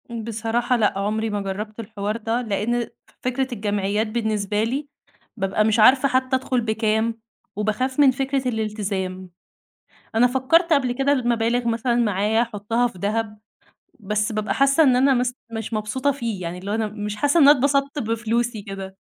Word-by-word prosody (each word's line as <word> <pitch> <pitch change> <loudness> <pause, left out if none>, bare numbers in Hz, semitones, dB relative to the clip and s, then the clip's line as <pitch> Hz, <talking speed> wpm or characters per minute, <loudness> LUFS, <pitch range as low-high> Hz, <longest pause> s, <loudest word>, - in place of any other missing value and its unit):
بصراحة 230 +1 -1
لأ، 210 -3 +1
عمري 215 +2 -1
ما 205 -1 -2
جرّبت 210 +3 -5
الحوار 210 -1 -4
ده. 230 +2 -1
لأن 230 +2 -1 0.3
فكرة 255 +1 -1
الجمعيات 205 0 -1
بالنسبة 215 -2 -1
لي 270 +6 -2 0.5
بابقى 195 +1 +1
مش 220 +1 +2
عارفة 260 +5 +6
حتّى 260 0 +1
أدخل 255 -1 0
بكام 220 0 0 0.4
وباخاف 215 +6 -1
من 280 -2 +7
فكرة 270 0 -1
الالتزام. 200 -5 -3 0.9
أنا 230 +2 +5
فكّرت 275 +8 +2
قبل 265 -5 +2
كده 270 +3 +1
المبالغ 240 -2 +1
مثلًا 235 +1 0
معايا 215 -1 +2
أحطها 230 +1 -1
في 210 -6 -7
دهب، 215 +2 -2 0.6
بس 210 +1 -1
بابقى 215 -1 -1
حاسّة 275 +3 +4
إن 260 -4 +4
أنا 270 +2 +4
مث 250 -1 +1 0.2
مش 225 0 -5
مبسوطة 220 +6 0
فيه، 230 -8 -4
يعني 170 0 -4
اللي 195 +3 -6
هو - - 0
أنا 220 -1 0
مش 210 0 -5
حاسّة 290 +9 +2
إن 280 - +7
أنا 290 0 +8
اتبسطت 280 +2 +1
بفلوسي 230 0 -1
كده. 195 -1 -8
225 Hz, 165 wpm, -22 LUFS, 210-255 Hz, 0.9 s, أنا